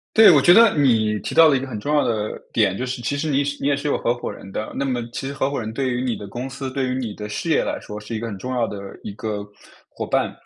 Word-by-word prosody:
对， 220 -3 +9
我 145 -4 +6
觉 175 - +7
得， 230 -1 +7
你 110 -6 +3
提 - - -5
到 165 -1 +8
了 140 - +4
一 - - -1
个 135 - -5
很 115 -5 -6
重 145 - -2
要 150 - +3
的 110 -2 -2
点 100 -4 +2
就 130 - -2
是， 125 -1 -4
其 140 +5 -1
实 155 +2 -2
你 140 0 +2
是 145 0 -4
你 - - -2
也 145 - +3
是 145 +1 -3
有 - - +1
合 120 - +1
伙 120 - -5
人 95 - -11
的。 110 - -4
那 140 - -1
么 125 -3 -1
其 135 - -4
实 140 - -4
合 135 0 0
伙 140 - -2
人 110 -1 -4
对 130 -1 -1
于 125 0 -1
你 120 -3 0
的 100 - -8
公 125 +5 -5
司、 135 0 -5
对 135 -1 -1
于 125 - -1
你 120 -5 -3
的 105 0 -7
事 160 +10 -3
业 - - +3
来 - - -3
说 105 - -8
是 105 +2 -7
一 110 - -3
个 115 - -4
很 100 -3 -6
重 130 +4 -5
要 120 -2 +1
的 105 -2 -5 0.2
一 100 - -6
个 105 -2 -4 0.4
伙 - - -6
伴。 - - 0
125 Hz, 350 characters per minute, -22 LUFS, 110-140 Hz, 0.4 s, 对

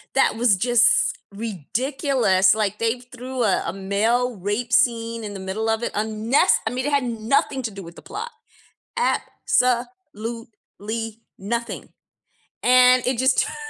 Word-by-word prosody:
that 270 - +3
was 225 -4 +3
just 245 +3 +3
ridiculous. 220 - +1
Like, 210 -1 -1
they 230 +2 0
threw 250 0 -5
a 195 -4 +2
a - - -3
male 220 +5 0
rape 205 +5 -3
scene 230 -1 +1
in 205 -1 -6
the - - -6
middle 205 +4 -3
of 225 +1 0
it. - - -3
Unnece 220 +4 +2
I - - 0
mean, 255 +2 -3
it - - -1
had 280 -2 +2
nothing 240 +3 0
to 225 - -2
do 195 0 -9
with 170 0 -12
the - - -12
plot. 465 +4 -7 0.6
Absolutely 230 - -2 0.2
nothing, 235 +4 -4 0.8
and 250 0 +5
it 255 -2 0
just 260 +1 +2
turned - - -6
230 Hz, 150 wpm, -22 LUFS, 210-250 Hz, 0.8 s, and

